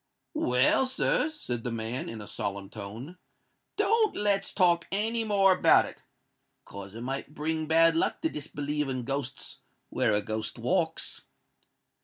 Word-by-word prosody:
"Well, 125 - +3
sir," 265 +3 +1
said 125 - -4
the - - -2
man, 115 +2 -2
in 115 -1 -7
a - - -8
solemn 100 -1 -4
tone, 115 - -8 0.6
"don't 430 +1 +2
let's 200 -1 +1
talk 175 -3 +3
any 225 +4 0
more 200 -3 +4
about 185 - +5
it—'cos 100 +1 -14
it 115 - -7
might 135 +4 -5
bring 155 +1 -2
bad 165 +1 +5
luck 165 - 0
to 320 - +1
disbelieve 150 - -3
in 130 -1 -3
ghosts 135 +1 -4 0.3
where 125 -4 +2
a 105 0 +3
ghost 110 +2 -3
walks." 160 +7 -1
150 Hz, 145 wpm, -28 LUFS, 115-195 Hz, 0.6 s, about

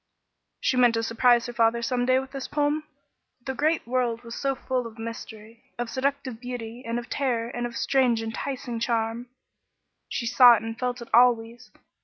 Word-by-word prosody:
She 255 - 0
meant 245 -2 +5
to 225 - 0
surprise 235 +1 +3
her 240 - -6
father 235 0 +2
some 245 +1 0
day 255 0 +4
with 265 0 -3
this 270 -1 -5
poem. 295 +1 0 0.6
The 265 - -2
great 310 +4 0
world 240 -1 -1
was 230 -1 -8
so 275 +2 -1
full 255 -2 -2
of 225 0 -13
mystery 225 0 -8 0.2
of 240 -1 -4
seductive 265 -3 -2
beauty 245 -1 -7
and 230 +1 -3
terror 240 -4 -1
and 240 0 -3
of 235 -1 -8
strange, 245 -4 +2
enticing 235 +1 -4
charm! 230 0 -1 0.8
She 235 - -3
saw 245 0 +8
and 225 +1 -5
felt 245 -1 -2
it - - -15
always. 235 -1 +3
240 Hz, 175 wpm, -26 LUFS, 230-255 Hz, 0.8 s, saw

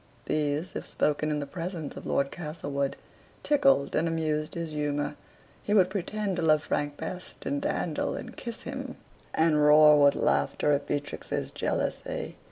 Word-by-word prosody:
These, 150 +3 -1
if - - -4
spoken 150 +1 0
in 150 -1 0
the - - -3
presence 165 0 -5
of - - -8
Lord 140 0 +1
Castlewood, 145 -4 -3 0.5
tickled 275 - +3
and 165 - +2
amused 155 -2 -1
his 165 -2 -3
humor; 145 -1 -1 0.5
he 210 - 0
would 185 -2 +5
pretend 200 0 -2
to - - 0
love 155 -2 +4
Frank 145 0 -2
best, 180 0 -7
and 285 0 -1
dandle 295 - -1
and - - -7
kiss 235 -2 -6
him, - - -6 0.4
and 160 -2 +3
roar 150 0 +7
with 140 0 +6
laughter 150 - +1
at 145 0 +1
Beatrix's 145 0 -3
jealousy. - - -2
155 Hz, 160 wpm, -28 LUFS, 145-180 Hz, 0.5 s, roar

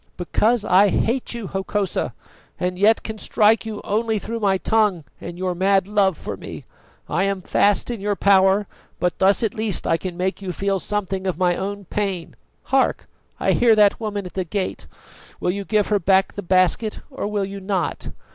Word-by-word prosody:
"Because 215 +5 +1
I 195 +3 +5
hate 235 +5 -1
you, 235 -3 -5
Hokosa, 195 +1 -2 0.4
and 180 0 -2
yet 220 +3 +4
can 220 -1 -6
strike 220 +1 +2
you 215 -2 -5
only 220 +1 0
through 230 +3 -4
my 195 -3 +2
tongue 210 -5 +1 0.2
and 175 0 -8
your 185 0 -1
mad 190 +1 +2
love 200 -4 +2
for - - -6
me. - - -9 0.4
I 180 +5 0
am 195 -2 -2
fast 205 +6 +2
in 230 -4 -5
your 205 0 0
power, 195 +1 +4 0.3
but 180 -1 -1
thus 195 +3 +3
at 220 - 0
least 215 -4 -2
I 165 - +2
can 180 0 -6
make 190 +2 -2
you 190 -2 -4
feel 195 0 -1
something 195 -1 -3
of 180 -4 -1
my 180 -1 +2
own 200 +1 -4
pain. 195 -3 -3 0.4
Hark! 270 - +2 0.3
I - - +2
hear 235 -2 +4
that 210 -1 +4
woman 205 -3 -3
at 180 - -9
the 190 - -1
gate. 190 +2 -4 0.5
Will 180 - 0
you 200 +1 -5
give 210 -1 +1
her 210 -1 +2
back 190 +1 +2
the 205 - -5
basket, 185 +4 +1
or 265 - -4
will 205 -1 -1
you 195 +1 -7
not? 190 -2 -2
200 Hz, 195 wpm, -22 LUFS, 185-210 Hz, 0.5 s, I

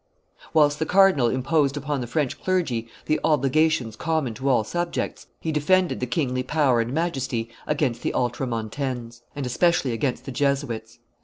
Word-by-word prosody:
Whilst 150 -2 +3
the 160 - -1
cardinal 190 -10 +5
imposed 140 +3 +1
upon 145 -1 -2
the 120 - -4
French 145 +1 -1
clergy 160 -12 0 0.2
the 155 - +1
obligations 145 -4 +2
common 160 -6 -1
to 135 +4 -2
all 125 -4 +3
subjects, 175 +10 -3
he 160 - -2
defended 180 +4 +2
the 125 - -2
kingly 130 -1 0
power 130 -3 +2
and 115 +1 -3
majesty 135 -7 -1 0.2
against 140 -6 0
the - - -2
Ultramoutanes, 120 0 -3
and 140 -2 -3
especially 140 +1 +2
against 125 +1 -2
the 135 - -5
Jesuits. 125 -4 -1
135 Hz, 155 wpm, -24 LUFS, 120-155 Hz, 0.2 s, cardinal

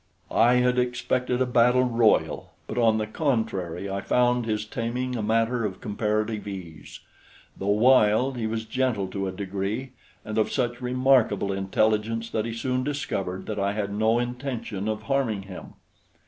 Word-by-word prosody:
I 120 +2 +5
had 125 0 +3
expected 125 0 0
a - - 0
battle 125 +1 +4
royal; 115 -3 +2
but 115 - -4
on 110 -2 +4
the 110 - -1
contrary 105 - -2
I 100 0 -3
found 125 +3 +2
his 105 -1 -1
taming 125 +3 -3
a 115 - -2
matter 115 +2 +1
of 95 -3 -3
comparative 105 -1 -2
ease. 90 -6 -8 0.5
Though 95 - -5
wild, 110 +3 +4
he 115 -2 -2
was 110 0 -3
gentle 115 -4 0
to 95 0 -3
a - - -2
degree, 100 +6 -4 0.3
and 110 +1 -2
of 110 - +1
such 120 -2 -1
remarkable 125 -6 +2
intelligence 110 +4 0
that 110 -1 -1
he 115 - -4
soon 130 +2 -1
discovered 100 -10 -3
that 105 -2 -4
I 100 0 0
had 100 -1 -3
no 110 +2 +2
intention 120 -4 -3
of 110 0 -2
harming 120 -7 0
him. 95 -2 -10
110 Hz, 160 wpm, -25 LUFS, 105-125 Hz, 0.5 s, I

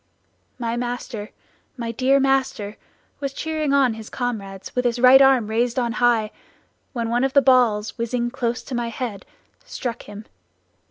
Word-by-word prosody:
"My 235 -1 -2
master, 240 -3 -4 0.5
my 230 -1 -3
dear 265 +4 +3
master 265 -6 0 0.4
was 275 -1 -3
cheering 310 -2 -2
on 275 -4 +3
his 220 -1 -9
comrades 200 -6 -5
with 250 - +1
his 240 -1 0
right 255 +2 +7
arm 265 -4 +5
raised 230 +3 0
on 240 -2 +1
high, 235 -3 +2 0.6
when 235 -3 -3
one 240 +2 +1
of 270 0 0
the 280 - +7
balls 240 -4 +3
whizzing 240 +1 -1
close 245 -2 -2
to 270 - -8
my 240 -1 -1
head 230 -3 -5 0.4
struck 245 - -5
him. 205 +1 -10
240 Hz, 160 wpm, -22 LUFS, 230-260 Hz, 0.6 s, right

